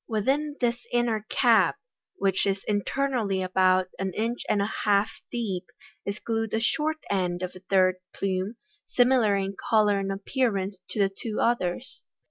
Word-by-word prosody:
Within 275 +7 0
this 240 -1 0
inner 230 -3 0
cap, - - +4 0.4
which 195 - +1
is 195 0 -1
internally 210 -2 0
about 185 0 +3
an 190 -1 -2
inch 230 +3 -1
and 205 - +2
a 200 +2 0
half 205 0 +3 0.2
deep, 195 -7 -3 0.4
is 200 +1 -2
glued 225 -1 -2
a - - +1
short 310 +7 0
end 180 -2 0
of 185 0 -4
a - - -9
third 185 -1 +3
plume, 190 +3 -2 0.3
similar 245 -4 +4
in 195 0 -2
colour 210 -3 +4
and 195 0 -2
appearance 195 -2 -1
to - - -4
the 195 -1 +4
two 220 0 -4
others. 235 0 -1
205 Hz, 155 wpm, -27 LUFS, 190-235 Hz, 0.4 s, cap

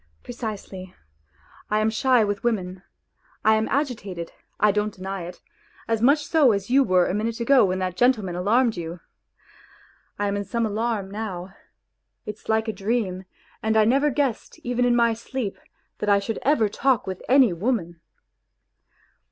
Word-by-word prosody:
Precisely; 205 -6 -7 0.7
I 210 - +1
am 215 +1 +2
shy 245 +1 +3
with 205 -1 -2
women, 190 -6 -2 0.6
I 220 - +6
am 220 0 +1
agitated, 205 - -3 0.3
I 210 0 +4
don't 210 +1 -1
deny 190 -1 -5
it, 175 - -10 0.5
as 225 -1 0
much 285 +5 +4
so 290 -8 +4
as 200 +3 -3
you 275 +1 +5
were 185 -5 +3
a - - -2
minute 225 +3 -2
ago 255 0 +5
when 185 0 -1
that 185 -1 -2
gentleman 225 -7 +2
alarmed 225 +6 +2
you. 170 0 -6 1.2
I 205 - -1
am 200 - -1
in 200 - -2
some 230 +2 -1
alarm 215 -2 -2
now. 195 -3 -5 0.7
It's 210 0 -8
like 220 +1 +1
a 220 - -1
dream, 195 -3 -2 0.4
and 220 0 +1
I 215 - +5
never 275 +6 +3
guessed 270 -4 -2
even 245 0 0
in 245 -1 +3
my 235 -1 +3
sleep 230 -2 -5 0.4
that 210 - -1
I 200 - +6
should 205 +3 -3
ever 275 -6 +3
talk 250 +3 +1
with 190 -1 -5
any 260 -6 +5
woman." 175 -4 -2
215 Hz, 165 wpm, -24 LUFS, 195-240 Hz, 1.2 s, I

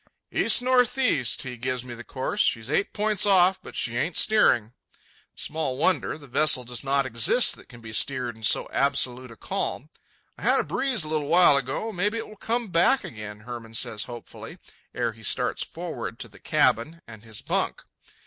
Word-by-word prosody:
"East 245 - +4
northeast," 250 - +2
he 125 -2 -7
gives 125 +1 -3
me 125 - -7
the 120 0 -9
course. 135 - -2
"She's 115 +2 +1
eight 175 +6 +1
points 210 -1 +1
off, 190 -1 +4
but - - -11
she 120 - -1
ain't 165 0 -1
steering." 125 - +3 0.6
Small 150 -4 -2
wonder. 180 +1 0
The 150 - -14
vessel 135 0 +2
does 120 +1 -4
not 140 0 +1
exist 120 - +3
that - - -17
can 120 -1 -14
be 110 -1 -9
steered 125 -1 +1
in 110 - -16
so 105 - +2
absolute 130 -2 0
a 115 - -12
calm. 150 +6 -4 0.5
"I - - -12
had - - +3
a - - +1
breeze 260 -10 0
a - - -5
little 155 -2 -2
while 170 -1 +6
ago—maybe 185 - -1
it 225 - -5
will 215 - -13
come 230 +2 -3
back 180 +10 +3
again," 105 -1 -8
Hermann 115 -1 -9
says 105 -1 -1
hopefully, 120 -1 -9 0.4
ere 120 -1 -1
he 110 0 -17
starts 110 - +1
forward - - -6
to - - -6
the - - -18
cabin 160 +9 +1
and 110 -2 -12
his 110 -2 -6
bunk. - - -2
135 Hz, 185 wpm, -25 LUFS, 120-185 Hz, 0.6 s, while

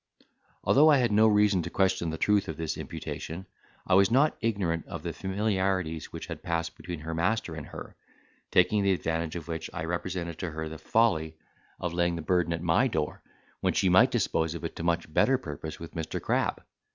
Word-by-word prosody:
Although 150 +3 +6
I 150 - +6
had 120 -4 +2
no 110 +2 +5
reason 105 -3 +4
to - - -5
question 95 -3 +1
the 80 - -4
truth 105 +1 +2
of - - -5
this 80 -1 -2
imputation, 85 +4 -6 0.4
I - - +1
was 95 +1 +6
not 140 +6 +3
ignorant 95 -8 -1
of - - -7
the - - -3
familiarities 95 -5 -1
which - - -6
had - - -7
passed 85 -1 -2
between 85 -3 -7
her 80 +1 -4
master 90 +2 0
and 80 -2 -7
her, - - -9 0.5
taking 100 +3 +4
the 100 -1 +3
advantage 80 -2 -2
of 85 -3 -6
which 80 -1 -4
I 90 - -4
represented 85 -1 -3
to 90 - -3
her 80 0 -5
the 80 0 -8
folly 85 -9 +1 0.4
of 90 -1 -3
laying 85 0 +1
the 85 - -5
burden 90 0 +1
at 85 -1 -2
my - - +3
door, - - -2 0.4
when - - +1
she 95 - +2
might 90 +1 +6
dispose 80 0 0
of 85 - -7
it - - -5
to - - -4
much 85 -2 -1
better 135 +9 +4
purpose 80 - -7
with 85 - -9
Mr. 80 -1 -3
Crab. - - 0
85 Hz, 205 wpm, -28 LUFS, 80-100 Hz, 0.5 s, Although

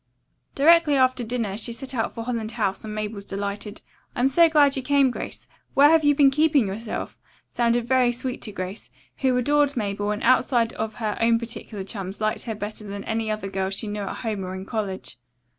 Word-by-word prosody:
Directly 320 0 +5
after 255 -2 +2
dinner 225 -4 -2
she 225 +2 -3
set 260 +3 -5
out 230 -3 -1
for 230 - -6
Holland 230 -2 -3
House 200 -4 -1
and 215 -1 -6
Mabel's 210 -1 -4
delighted: 200 +1 -5 0.3
"I'm 255 +2 +2
so 335 +4 +5
glad 290 -3 +4
you 265 - -2
came, 275 -1 +3
Grace. - - -6 0.3
Where 290 +2 +7
have 325 -1 +4
you 290 0 +4
been 280 -2 +5
keeping 300 -3 +3
yourself?" 210 +3 -5 0.3
sounded 235 0 0
very 255 -1 +3
sweet 250 +1 -5
to 215 - -5
Grace, 190 +1 -6 0.3
who 260 -2 +2
adored 290 +2 +2
Mabel 205 -1 -2
and 210 0 -2
outside 240 -2 +3
of 220 0 -4
her 215 -3 -3
own 230 0 +4
particular 225 -3 -6
chums 195 -1 -5
liked 215 0 -1
her 225 -2 -3
better 210 +1 -5
than 200 -1 -6
any 220 0 -2
other 215 -2 -3
girl 190 -1 -2
she 195 +3 -3
knew 205 0 -4
at 195 - -4
home 210 -3 -2
or 185 0 -5
in 190 0 -7
college. 195 - -5
225 Hz, 205 wpm, -24 LUFS, 205-260 Hz, 0.3 s, Where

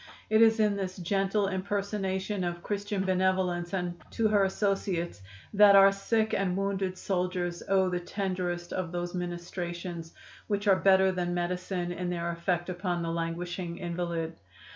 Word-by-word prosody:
It 220 +1 +5
is 225 0 +6
in 210 -2 +3
this 185 -2 -4
gentle 195 +3 +1
impersonation 195 0 -2
of 175 0 -3
Christian 205 -1 -2
benevolence 185 -2 +1
and 175 -2 -3
to 225 - +1
her 205 -2 +4
associates 190 - -1 0.3
that 205 -1 +8
our 195 0 +8
sick 220 +2 0
and 190 -2 0
wounded 195 -1 -1
soldiers 180 -2 -2
owe 190 -1 +4
the 180 -1 -1
tenderest 180 -1 -3
of 185 -3 -3
those 175 0 -3
ministrations 175 -1 -5 0.3
which 205 0 -1
are 195 - +7
better 190 0 +5
than 175 -1 -2
medicine 180 0 -2
in 175 0 -3
their 170 -1 -2
effect 175 +1 -1
upon 180 -1 -2
the 165 - -2
languishing 170 +1 -3
invalid. 170 -2 -3
185 Hz, 150 wpm, -29 LUFS, 175-195 Hz, 0.3 s, that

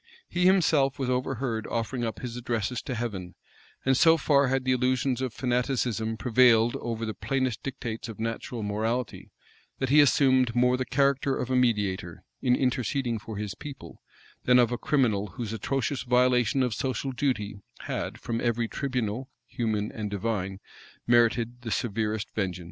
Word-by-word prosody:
He 180 +1 +2
himself 155 -7 +3
was 130 -2 -1
overheard 125 -3 -2
offering 120 +2 -2
up 115 -1 -3
his 120 -2 -5
addresses 120 -1 -2
to 130 - -4
Heaven; 100 -7 -4 0.5
and 135 0 +4
so 165 +3 +6
far 140 -2 +3
had 135 0 0
the 130 - +2
illusions 130 0 +1
of 130 -2 -1
fanaticism 120 -3 -1
prevailed 120 +1 +4
over 115 -1 -4
the 110 - -3
plainest 130 +2 -1
dictates 120 -4 -5
of 110 - -9
natural 115 0 -4
morality, 110 +4 -2 0.5
that 130 - -2
he 150 +2 +7
assumed 130 -3 +3
more 125 +1 +4
the 130 0 -3
character 140 0 +2
of 125 - -3
a - - +2
mediator, 105 -8 0 0.2
in 125 -1 +3
interceding 125 -2 0
for 110 -1 -8
his 105 -1 -4
people, 140 +5 -10 0.4
than 125 0 +6
that 125 - +7
of 120 - -1
a 120 - -1
criminal, 110 -8 +1
whose 115 -3 -4
atrocious 135 +4 -1
violation 125 +1 +3
of 125 -3 0
social 130 +3 -2
duty 110 -7 -2 0.2
had, - - -4
from 115 0 -3
every 120 -1 0
tribunal, 125 -2 -3 0.2
human 110 -4 -2
and 105 -2 -4
divine, 100 -2 -2 0.5
merited 120 0 +2
the 120 - -5
severest 110 0 -1
vengeance. 95 -4 -2
120 Hz, 165 wpm, -27 LUFS, 110-130 Hz, 0.5 s, he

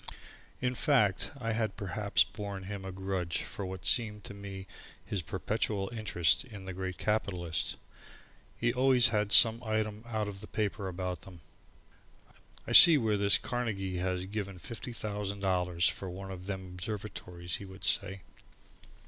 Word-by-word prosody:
In 125 -1 0
fact, 120 - +2
I 115 -2 -2
had 110 -2 -1
perhaps 100 +1 +2
borne 100 -2 -7
him 95 0 -6
a 95 - -5
grudge 95 -3 -2
for 100 - -6
what 95 0 -7
seemed 110 -4 0
to - - -7
me 100 -1 -8 0.4
his 100 - -2
perpetual 100 +4 -2
interest 90 -8 +2
in 105 -7 -10
the 95 - -5
great 95 0 -5
capitalists. 90 -6 -1 0.8
He 120 0 +1
always 130 -1 +5
had 105 -3 0
some 115 +1 +7
item 110 -1 -2
out 110 -2 -2
of 100 -1 -7
the 105 - -9
paper 100 -2 -2
about 90 -2 -4
them. 90 -4 -13 1.2
"I - - -6
see 165 -3 +11
where 110 -5 +1
this 100 0 +5
here - - -11
Carnegie 100 -7 -2
has 90 0 -1
give 100 +1 -3
fifty 115 +5 -7
thousand 105 -3 -4
dollars 90 -3 +2
for 95 - -3
one 95 +2 -7
of 90 0 -8
them 95 -2 -4
observatories," 90 -2 -5
he 100 - -9
would 95 0 -12
say. 95 +2 +1
100 Hz, 160 wpm, -31 LUFS, 95-110 Hz, 1.2 s, see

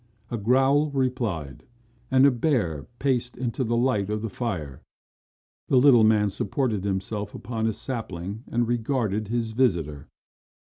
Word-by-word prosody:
A 120 - -1
growl 135 +7 +3
replied 120 - -2 0.5
and 130 +1 +5
a 140 - +6
bear 115 - 0
paced 125 -2 -1
into 125 +1 -2
the 120 0 0
light 115 -5 +1
of 105 0 -2
the 115 - -3
fire. 85 - -4 0.9
The 130 - +3
little 125 -3 +7
man 105 -2 +4
supported 105 0 -1
himself 100 +1 -3
upon 110 0 -3
a 110 - 0
sapling 105 -4 -5
and 120 0 0
regarded 115 -3 -1
his 115 0 -2
visitor. 85 - 0
115 Hz, 140 wpm, -25 LUFS, 100-125 Hz, 0.9 s, little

